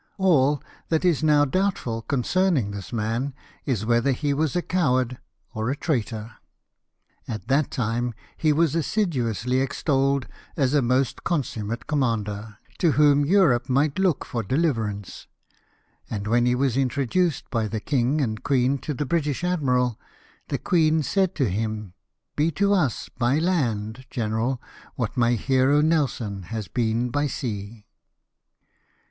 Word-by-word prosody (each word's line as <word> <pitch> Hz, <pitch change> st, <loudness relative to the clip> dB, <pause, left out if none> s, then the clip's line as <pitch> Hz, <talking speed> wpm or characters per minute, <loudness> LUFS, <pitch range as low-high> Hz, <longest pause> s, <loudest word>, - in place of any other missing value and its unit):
All 150 Hz, -8 st, +3 dB, 0.3 s
that 160 Hz, +2 st, +1 dB
is 170 Hz, -5 st, +3 dB
now 150 Hz, -2 st, +4 dB
doubtful 145 Hz, -, -1 dB
concerning 140 Hz, -, +1 dB
this 100 Hz, -2 st, -7 dB
man 115 Hz, +4 st, -2 dB, 0.3 s
is 115 Hz, -6 st, 0 dB
whether 120 Hz, +4 st, +2 dB
he 145 Hz, +2 st, -1 dB
was 155 Hz, +2 st, 0 dB
a 175 Hz, -, +1 dB
coward 130 Hz, -8 st, +1 dB, 0.3 s
or 110 Hz, 0 st, -2 dB
a 135 Hz, -, 0 dB
traitor; 115 Hz, -7 st, -2 dB, 1.0 s
at 110 Hz, -2 st, -5 dB
that 140 Hz, +2 st, +2 dB
time 120 Hz, 0 st, -2 dB, 0.2 s
he 155 Hz, -, +2 dB
was 155 Hz, 0 st, +2 dB
assiduously 130 Hz, -, 0 dB
extolled 135 Hz, 0 st, +1 dB, 0.3 s
as 135 Hz, -2 st, +2 dB
a 145 Hz, -, +4 dB
most 125 Hz, +1 st, +1 dB
consum 135 Hz, -10 st, -2 dB
mate 115 Hz, +2 st, -4 dB
commander, 110 Hz, -7 st, -2 dB, 0.2 s
to 165 Hz, -4 st, +3 dB
whom 145 Hz, -1 st, +5 dB
Europe 155 Hz, -9 st, +3 dB
might 140 Hz, +5 st, +2 dB
look 185 Hz, -6 st, +1 dB
for 120 Hz, -, -3 dB
deliverance; 110 Hz, -, -2 dB, 0.8 s
and 100 Hz, -2 st, -4 dB
when 120 Hz, +3 st, +2 dB
he 125 Hz, -, +3 dB
Avas 135 Hz, 0 st, +1 dB
introduced 140 Hz, +5 st, 0 dB
by 115 Hz, -3 st, 0 dB
the 110 Hz, +1 st, -3 dB
king 135 Hz, +4 st, +1 dB
and 110 Hz, -4 st, -2 dB
queen 135 Hz, 0 st, +1 dB
to 145 Hz, +3 st, -4 dB
the 145 Hz, -, -2 dB
British 150 Hz, 0 st, -1 dB
admiral, 125 Hz, -9 st, +1 dB, 0.5 s
the -, -, -1 dB
queen 160 Hz, -3 st, +2 dB
said 190 Hz, +3 st, +1 dB
to 135 Hz, -5 st, +1 dB
him, 105 Hz, -1 st, -3 dB, 0.2 s
'' -, -, -57 dB
Be 150 Hz, +3 st, +2 dB
to 200 Hz, +5 st, +2 dB
us 155 Hz, -, 0 dB
by 125 Hz, +3 st, +2 dB
land, 130 Hz, -, -1 dB
general, 115 Hz, +3 st, -1 dB, 0.4 s
what -, -, -3 dB
my 120 Hz, -1 st, +3 dB
hero 130 Hz, +4 st, +3 dB
Nelson 135 Hz, -10 st, 0 dB
has 110 Hz, -2 st, -4 dB
been 120 Hz, +1 st, 0 dB
by 145 Hz, +2 st, +1 dB
sea." 105 Hz, -5 st, -5 dB
130 Hz, 145 wpm, -24 LUFS, 115-150 Hz, 1.0 s, whom